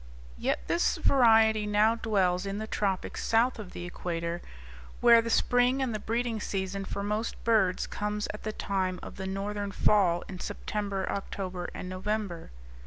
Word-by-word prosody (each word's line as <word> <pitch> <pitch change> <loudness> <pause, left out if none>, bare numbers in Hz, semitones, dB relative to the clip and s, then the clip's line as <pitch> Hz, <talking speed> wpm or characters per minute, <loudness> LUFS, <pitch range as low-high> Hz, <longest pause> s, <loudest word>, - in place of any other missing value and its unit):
Yet - - 0
this - - +1
variety 220 -4 +4
now 210 +2 +4
dwells 195 -5 +1
in 195 +1 -3
the 215 - -3
tropics 195 -3 -2
south 230 +2 +2
of 200 -4 -8
the 175 - -6
equator, 170 -1 -4 0.6
where 235 -1 +7
the 230 - -4
spring, 245 +3 +3
and 260 -4 0
the 215 - -2
breeding 230 +1 -1
season 195 -1 -3
for 200 - -4
most 210 +2 -3
birds, 215 -6 +2
comes 210 0 -3
at 210 - -8
the 215 - -3
time 190 -3 -2
of - - -9
the 190 -1 -4
northern 200 +1 -3
fall 185 -4 +3
in 185 -2 -8
September, 200 -1 -3
October, 185 -2 -4
and - - -6
November. 185 -1 -3
205 Hz, 165 wpm, -29 LUFS, 190-220 Hz, 0.6 s, where